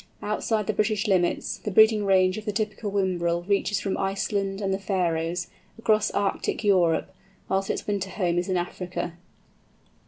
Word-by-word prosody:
Outside 210 0 -1
the 215 - 0
British 215 +1 0
limits, 185 -3 +1
the - - -4
breeding 220 +1 +5
range 185 -1 +4
of 215 - -12
the 210 - -1
typical 210 0 -2
Whimbrel 175 -3 0
reaches 200 0 +1
from 195 - -2
Iceland 195 0 -1
and 195 -2 -1
the 190 - -1
Faröes, 175 -3 -1 0.3
across 215 -1 +2
Arctic 200 +1 -1
Europe, 180 -5 +2 0.3
whilst 195 0 0
its - - -2
winter 200 -2 -2
home 175 -3 0
is 180 - -3
in 185 - +1
Africa. 175 0 -4
195 Hz, 160 wpm, -26 LUFS, 180-210 Hz, 0.3 s, breeding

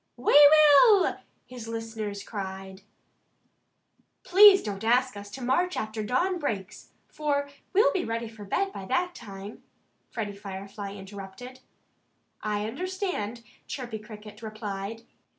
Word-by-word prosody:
"We 245 - +1
will!" 305 - +7 0.3
his 245 -3 -9
listeners 225 -3 -5
cried. 190 -2 -7 1.4
"Please 390 +1 +8
don't 205 -1 -5
ask 250 +2 +2
us 205 0 -9
to 255 +5 -8
march 350 +9 +1
after 215 0 -3
dawn 350 - 0
breaks, 210 - -5 0.2
for 285 -2 -1 0.2
we'll 410 +4 +4
be 375 - 0
ready 230 +1 -3
for 220 -2 -11
bed 390 - -1
by 195 - -7
that 350 - 0
time," 200 - -10 0.5
Freddie 205 -3 -4
Firefly 200 0 -7
interrupted. 200 +6 -10 0.8
"I 210 -1 -2
understand," 275 - -4 0.2
Chirpy 240 -5 -5
Cricket 210 -1 -12
replied. 215 0 -6
225 Hz, 120 wpm, -27 LUFS, 205-285 Hz, 1.4 s, Please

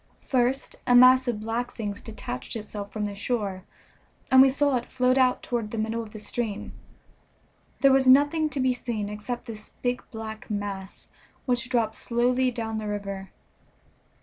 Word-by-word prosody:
First 260 +1 0
a 245 - +5
mass 255 +1 +7
of 220 -3 -1
black 230 +3 -2
things 210 -3 -5
detached 215 - -6
itself 210 -2 -6
from 215 -1 -2
the 205 - -4
shore, 200 -3 -3 0.7
and 260 0 +9
we 270 - +7
saw 285 +1 +2
it 240 - -5
float 255 0 +2
out 255 -1 +3
toward 235 -3 -2
the 225 - -5
middle 220 +1 -1
of 225 - -8
the 215 - -9
stream. 215 0 -4 1.1
There 275 - +6
was 265 -1 +3
nothing 290 +4 +5
to 290 - -4
be 260 -1 +2
seen 230 -4 -4
except 210 +4 -5
this 215 -3 -9
big 245 0 0
black 220 +1 -8
mass, 200 -2 -5 0.4
which 245 -1 0
dropped 230 -3 +1
slowly 250 +3 +1
down 225 -2 -3
the 215 - -5
river. 200 -2 -5
235 Hz, 170 wpm, -26 LUFS, 210-255 Hz, 1.1 s, and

